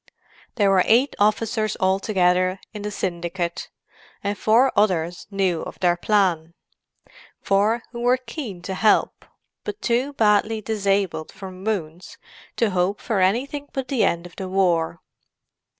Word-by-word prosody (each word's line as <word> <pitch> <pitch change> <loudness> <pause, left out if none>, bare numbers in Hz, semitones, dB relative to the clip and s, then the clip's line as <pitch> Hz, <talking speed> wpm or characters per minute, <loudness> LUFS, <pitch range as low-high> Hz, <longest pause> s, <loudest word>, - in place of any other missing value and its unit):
There 205 -4 +3
were 190 -1 +5
eight 245 +6 +3
officers 215 +1 +1
altogether 185 -1 +2
in 210 - -6
the 210 - -3
"syndicate," 175 -2 -3 0.5
and 200 0 -1
four 235 +6 +3
others 175 -4 +1
knew 190 -5 0
of - - -8
their 175 -1 +3
plan—four 195 +3 -2
who 235 -1 -6
were 245 +1 +3
keen 245 - -7
to 190 - -4
help, 210 +3 +2 0.4
but 420 -1 -5
too 250 +4 0
badly 215 -1 +2
disabled 200 -6 -1
from 190 -1 -10
wounds 180 -5 -4 0.4
to 230 -3 +1
hope 185 +2 0
for 220 -4 -1
anything 260 +10 0
but 265 -2 -4
the 265 -5 +1
end 170 +1 0
of 175 - -13
the 190 -2 -5
war. 175 -3 +1
195 Hz, 135 wpm, -23 LUFS, 180-220 Hz, 0.5 s, were